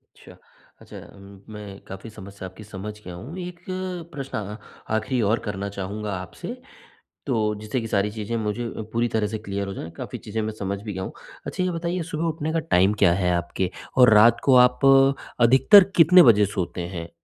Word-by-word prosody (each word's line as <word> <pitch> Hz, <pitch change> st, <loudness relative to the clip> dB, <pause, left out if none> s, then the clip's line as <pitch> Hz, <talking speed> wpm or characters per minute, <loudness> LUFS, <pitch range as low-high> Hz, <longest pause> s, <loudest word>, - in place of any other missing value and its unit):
अच्छा। -, -, -16 dB, 0.4 s
अच्छा -, -, -12 dB, 0.2 s
उम, 100 Hz, 0 st, -14 dB
मैं 100 Hz, -2 st, -9 dB
काफ़ी 95 Hz, +4 st, -9 dB
समस्या 100 Hz, -3 st, -10 dB
आपकी 95 Hz, +4 st, -13 dB
समझ 105 Hz, 0 st, -7 dB
गया 90 Hz, -, -8 dB
हूँ, 130 Hz, -, -9 dB
एक 180 Hz, -1 st, -7 dB, 0.5 s
प्रश्न 135 Hz, -4 st, -5 dB
अ, 105 Hz, 0 st, -5 dB, 0.4 s
आखिरी 120 Hz, +3 st, -1 dB
और 115 Hz, -, +2 dB
करना 100 Hz, 0 st, -3 dB
चाहूँगा 100 Hz, +2 st, -5 dB
आपसे, 95 Hz, -, -7 dB, 0.7 s
तो 110 Hz, -5 st, 0 dB
जिससे 110 Hz, +4 st, -2 dB
कि 115 Hz, -, -5 dB
सारी 105 Hz, 0 st, 0 dB
चीज़ें 110 Hz, +1 st, -4 dB
मुझे 110 Hz, +2 st, -2 dB
अ, 115 Hz, -, -6 dB
पूरी 120 Hz, +1 st, +1 dB
तरह 110 Hz, -1 st, +1 dB
से 110 Hz, +1 st, -4 dB
क्लियर 100 Hz, -2 st, -4 dB
हो 100 Hz, -, -5 dB
जाएँ, 80 Hz, -, -7 dB
काफ़ी -, -, -6 dB
चीज़ें 110 Hz, +1 st, -4 dB
मैं 110 Hz, 0 st, -3 dB
समझ 100 Hz, 0 st, -3 dB
भी 105 Hz, -2 st, -6 dB
गया 95 Hz, 0 st, -4 dB
हूँ। -, -, -6 dB, 0.3 s
अच्छा, 185 Hz, -, -3 dB
ये 185 Hz, -, 0 dB
बताइए 170 Hz, +1 st, -3 dB
सुबह 155 Hz, +2 st, -2 dB
उठने 160 Hz, 0 st, -3 dB
का 165 Hz, -, +1 dB
टाइम 100 Hz, -, +2 dB
क्या 85 Hz, -, +6 dB
है 90 Hz, 0 st, 0 dB
आपके 85 Hz, +1 st, -2 dB, 0.3 s
और 125 Hz, -3 st, +7 dB
रात 115 Hz, +2 st, +6 dB
को 135 Hz, -2 st, +5 dB
आप 125 Hz, +2 st, -4 dB, 0.5 s
अधिकतर 130 Hz, -, +7 dB
कितने 175 Hz, +2 st, +7 dB
बजे 105 Hz, -5 st, +6 dB
सोते 90 Hz, -1 st, -3 dB
हैं? 85 Hz, 0 st, -6 dB
105 Hz, 200 wpm, -24 LUFS, 100-125 Hz, 0.7 s, और